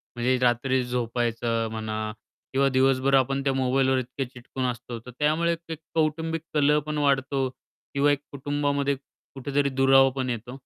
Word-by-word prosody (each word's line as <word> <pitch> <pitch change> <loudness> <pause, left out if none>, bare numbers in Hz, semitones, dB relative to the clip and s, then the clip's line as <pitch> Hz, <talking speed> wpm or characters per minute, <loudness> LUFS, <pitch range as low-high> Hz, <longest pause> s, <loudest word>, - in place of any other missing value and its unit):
म्हणजे 125 +2 +1
रात्री 125 +1 +2
झोपायचं 115 -1 -1
म्हणा 110 -1 -3 0.4
किंवा 135 +1 +3
दिवसभर 135 +1 +2
आपण 135 +1 +2
त्या 135 -1 +1
मोबाईलवर 130 0 +2
इतके 130 +2 -4
चिटकून 125 +1 -6
असतो 120 -1 -4
तर 125 - -9
त्यामुळे 165 +3 +2
एक 160 - -4 0.2
कौटुंबिक 160 +1 0
कलह 150 0 +4
पण 150 0 -3
वाढतो 135 -2 +1
किंवा 140 +2 -2
एक 145 - +1
कुटुंबामध्ये 140 0 0
कुठेतरी 140 +1 -3
दुरावा 135 0 +5
पण 130 -1 -2
येतो? 120 +2 -4
135 Hz, 145 wpm, -26 LUFS, 125-140 Hz, 0.4 s, दुरावा